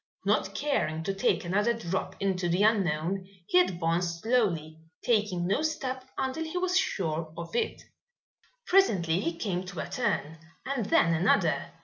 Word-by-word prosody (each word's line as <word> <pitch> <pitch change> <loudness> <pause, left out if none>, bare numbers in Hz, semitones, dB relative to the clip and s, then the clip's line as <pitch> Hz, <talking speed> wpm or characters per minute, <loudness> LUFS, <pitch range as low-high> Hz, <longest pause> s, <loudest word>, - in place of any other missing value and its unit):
Not - - +1
caring 160 - -1
to 195 - -1
take 195 -1 +1
another 205 +6 +2
drop 190 -4 -3
into 185 -3 0
the 180 +4 +2
unknown, 185 -3 +1 0.2
he 180 - +4
advanced 170 -1 0
slowly, 175 -10 +1 0.2
taking 210 -7 +1
no 195 +10 +1
step 260 -5 -2
until 265 +4 -1
he 320 +2 -4
was 365 0 0
sure 165 - 0
of 170 +3 -7
it. - - -1 0.8
Presently 185 - +3
he 170 -3 -2
came 185 -3 -2
to 180 -2 -7
a - - -3
turn 190 -10 -2 0.3
and 260 -6 -2
then 165 -4 +4
another. 170 -1 +2
185 Hz, 150 wpm, -28 LUFS, 170-235 Hz, 0.8 s, he